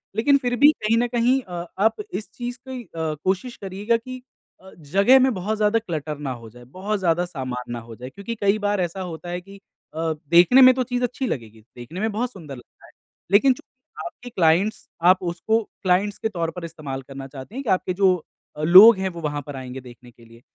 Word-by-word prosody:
लेकिन 280 +6 +4
फिर 245 -2 -2
भी 290 +4 +7
कहीं 225 +2 +2
न 240 +1 +2
कहीं 245 +2 +2
अ, 175 -5 -7
आप 220 +2 +3 0.2
इस 215 - -5
चीज़ 245 0 -6
की 255 -2 -6
अ, 160 -4 -4
कोशिश 190 +6 -1
करिएगा 205 +4 -1
कि 255 +2 -9 0.4
अ, 190 - -14
जगह 200 - +4
में 260 -1 +3
बहुत 210 +3 -3
ज़्यादा 215 +1 +2
क्लटर 155 -7 -5
ना 140 -3 -4
हो 110 - -10
जाए, 120 +2 -15
बहुत 190 - -4
ज़्यादा 175 -1 +1
सामान 130 -7 -6
ना 120 - -4
हो 115 0 -11
जाए 125 +2 -9
क्योंकि 200 - -7
कई 200 +1 +3
बार 205 -2 0
ऐसा 175 +2 -3
होता 175 -1 -7
है 180 +1 -4
कि 195 +2 -14 0.4
अ, 160 0 -1 0.2
देखने 180 +10 +6
में 255 0 +9
तो 255 - 0
चीज़ 245 0 -3
अच्छी 250 +2 -2
लगेगी, 110 - -6
देखने 135 +10 -8
में 220 0 0
बहुत 240 +4 -2
सुंदर 155 - -10
लगता 120 - -17
है। - - -20 0.4
लेकिन 255 +6 +5
जो - - -16 0.4
आपके 245 -7 -9
क्लाइंट्स 185 +3 +1 0.2
आप 185 0 +4
उसको 200 +6 0 0.2
क्लाइंट्स 190 +3 +1
के 220 - -2
तौर 170 -4 -3
पर 180 -1 -7
इस्तेमाल 150 -5 -6
करना 135 0 -9
चाहते 135 - -11
हैं 275 - -4
कि 235 - -4
आपके 185 -1 +1
जो 195 0 +3 0.6
लोग 190 +6 +9
हैं 190 0 -1
वो 170 -1 -9
वहाँ 145 -1 -3
पर 145 - -7
आएँगे 130 0 -7
देखने 125 0 -14
के 115 0 -20
लिए। 115 +1 -18
185 Hz, 220 wpm, -23 LUFS, 155-230 Hz, 0.6 s, में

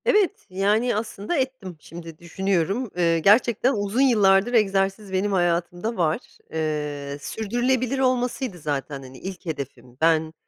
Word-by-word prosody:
Evet, 420 -8 +2
yani 205 +6 +1
aslında 215 - -3
ettim. 260 - -3
Şimdi 165 0 -10
düşünüyorum. 190 +6 -1
Eee, 170 -1 +3
gerçekten 235 - +4
uzun 205 +4 0
yıllardır, 210 -3 +4
egzersiz 195 -2 +1
benim 195 +2 +1
hayatımda 175 +4 0
var. 160 -3 +1 0.3
Eee, 150 -3 -3
sürdürülebilir 245 - -1
olmasıydı 250 -5 0
zaten 145 -2 -3
hani, 130 0 -11
ilk 190 -1 -7
hedefim. 135 -6 -6
Ben, 160 -1 +3
195 Hz, 125 wpm, -24 LUFS, 165-235 Hz, 0.3 s, gerçekten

